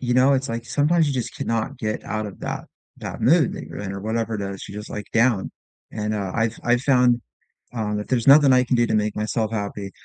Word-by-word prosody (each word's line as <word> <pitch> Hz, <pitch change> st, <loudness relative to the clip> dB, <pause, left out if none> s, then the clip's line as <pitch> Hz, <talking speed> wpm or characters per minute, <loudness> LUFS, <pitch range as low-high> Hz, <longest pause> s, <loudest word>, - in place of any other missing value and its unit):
you 125 Hz, -1 st, 0 dB
know, 130 Hz, +2 st, +5 dB
it's, 135 Hz, +1 st, -1 dB
like, 115 Hz, 0 st, -4 dB
sometimes 155 Hz, +5 st, +2 dB
you 140 Hz, -, 0 dB
just 125 Hz, -2 st, -3 dB
cannot 115 Hz, -1 st, -2 dB
get 110 Hz, 0 st, -3 dB
out 110 Hz, -1 st, -3 dB
of 100 Hz, -, -10 dB
that -, -, -4 dB, 0.3 s
that -, -, -6 dB
mood -, -, +4 dB
that -, -, -6 dB
you're -, -, -8 dB
in, 100 Hz, -1 st, -5 dB
or 95 Hz, -, -6 dB
whatever 110 Hz, +2 st, -2 dB
it 100 Hz, -, -5 dB
is, 100 Hz, -1 st, -6 dB
you're 105 Hz, -, -7 dB
just, 105 Hz, -, -10 dB
like, 105 Hz, -, -5 dB
down, 115 Hz, -3 st, +2 dB, 0.4 s
and, 105 Hz, 0 st, -2 dB
uh, 100 Hz, -3 st, -3 dB
I've 115 Hz, 0 st, 0 dB
I've 120 Hz, 0 st, +3 dB
found, 125 Hz, -3 st, +4 dB, 0.5 s
uh, 105 Hz, -2 st, -2 dB
that 105 Hz, -, -5 dB
there's 125 Hz, 0 st, +1 dB
nothing 140 Hz, -1 st, +8 dB
I 125 Hz, 0 st, +5 dB
can 125 Hz, 0 st, +1 dB
do 120 Hz, -, +3 dB
to -, -, -1 dB
make 105 Hz, 0 st, 0 dB
myself 110 Hz, +1 st, -1 dB
happy. 100 Hz, -2 st, -4 dB
115 Hz, 245 wpm, -23 LUFS, 105-125 Hz, 0.5 s, nothing